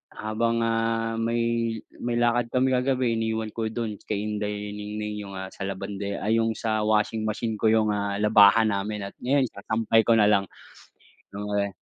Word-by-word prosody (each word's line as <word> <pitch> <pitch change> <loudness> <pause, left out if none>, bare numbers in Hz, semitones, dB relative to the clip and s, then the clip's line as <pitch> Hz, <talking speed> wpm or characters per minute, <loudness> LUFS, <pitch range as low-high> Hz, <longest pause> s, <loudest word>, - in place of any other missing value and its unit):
habang, 115 +2 -1
ah, 115 0 0
may 115 0 0 0.2
may 120 0 -2
lakad 120 0 +2
kami 130 +1 +3
kagabi 125 -2 +1
iniwan 110 -1 -2
ko 110 0 -3
do'n 110 -2 -4
kay 105 - -1
Inday 105 -1 -3
Ningning 105 0 -5
'yong 100 - -9 0.2
sa 95 - -5
labandera, 100 +1 -4
ay 110 +2 +2
'yong 115 0 0
sa 110 -1 -1
washing 110 +1 +1
machine 110 0 -2
ko - - +2
yung 110 -1 +3 0.3
labahan 105 +1 +6
namin 105 +1 -3
at - - -35
ngayon 135 +2 +2
sasampay 110 +2 +1
ko 115 - +5
na 105 -1 +5
lang. 100 -2 +2 0.9
Oo, 105 +1 -3
eh 100 -1 -1
110 Hz, 165 wpm, -25 LUFS, 105-115 Hz, 0.9 s, labahan